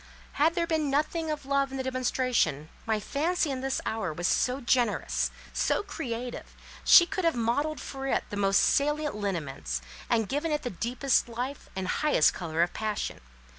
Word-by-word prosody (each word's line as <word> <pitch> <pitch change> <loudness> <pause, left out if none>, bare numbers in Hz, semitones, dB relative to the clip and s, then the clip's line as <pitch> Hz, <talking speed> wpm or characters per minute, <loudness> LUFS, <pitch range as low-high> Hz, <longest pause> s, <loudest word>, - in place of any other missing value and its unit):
Had 320 +4 +2
there 340 -2 +1
been 315 -3 0
nothing 310 +3 0
of 300 -3 -3
love 275 0 +1
in 270 - -5
the 260 - -2
demonstration, 255 - 0 0.2
my 220 -1 +1
Fancy 305 - 0
in 260 -1 -3
this 270 0 -1
hour 220 -6 -2
was 175 +3 -1
so 255 +2 +1
generous, 240 -3 +1 0.2
so - - +1
creative, 250 - -5 0.3
she 345 - +9
could 375 +2 -3
have 330 -4 +2
modelled 280 +7 0
for 270 0 -6
it - - +1
the - - -3
most 195 -1 +3
salient 295 +1 +2
lineaments, 155 - -3 0.3
and 225 -3 +2
given 295 +6 -1
it 300 - -1
the 245 - -3
deepest 245 +6 0
life 250 +4 -5
and 190 -1 -3
highest 300 - +3
colour 165 -1 0
of 175 - -2
passion. 215 -1 -3
255 Hz, 175 wpm, -28 LUFS, 215-295 Hz, 0.3 s, she